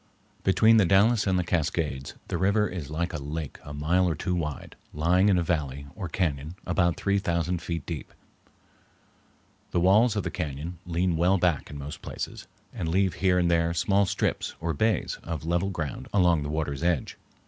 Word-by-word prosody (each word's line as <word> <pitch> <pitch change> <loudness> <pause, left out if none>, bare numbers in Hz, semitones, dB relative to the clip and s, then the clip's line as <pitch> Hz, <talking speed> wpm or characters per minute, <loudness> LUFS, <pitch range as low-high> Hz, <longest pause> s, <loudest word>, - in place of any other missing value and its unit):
Between 110 +4 +5
the 105 - +5
Dalles 105 +3 +4
and 95 -1 +2
the 90 - +1
Cascades 80 -5 -1
the - - -2
river 100 +3 +3
is 85 -7 -6
like 85 +4 -2
a 80 - -3
lake 75 +1 -5
a 75 - -9
mile 85 +5 +1
or 80 - -1
two 90 +4 -2
wide, 75 -5 -4 0.2
lying 90 +6 +3
in 95 - +4
a 85 - +1
valley, 70 -5 -2
or 90 - -5
cañon, 80 -2 -2
about 85 -1 +1
three 100 0 +1
thousand 85 -1 -1
feet 85 -3 -4
deep. 80 -6 -6 1.6
The - - 0
walls 105 +6 +4
of 105 - 0
the - - -3
cañon 80 0 -4
lean 85 0 0
well 90 +4 +3
back 85 -5 +1
in 75 - -7
most 70 +2 -7
places, - - -6 0.3
and 80 - -3
leave 95 +2 +2
here 95 -2 +4
and 85 -1 +2
there 85 0 +2
small 100 +3 +2
strips, - - -1
or 80 0 -1
bays, 110 +8 0
of 80 -2 -5
level 85 +3 +1
ground 80 -7 -4
along 90 -5 +3
the 75 - -4
water's 75 -2 -2
edge. 85 -4 -1
85 Hz, 190 wpm, -27 LUFS, 80-95 Hz, 1.6 s, Between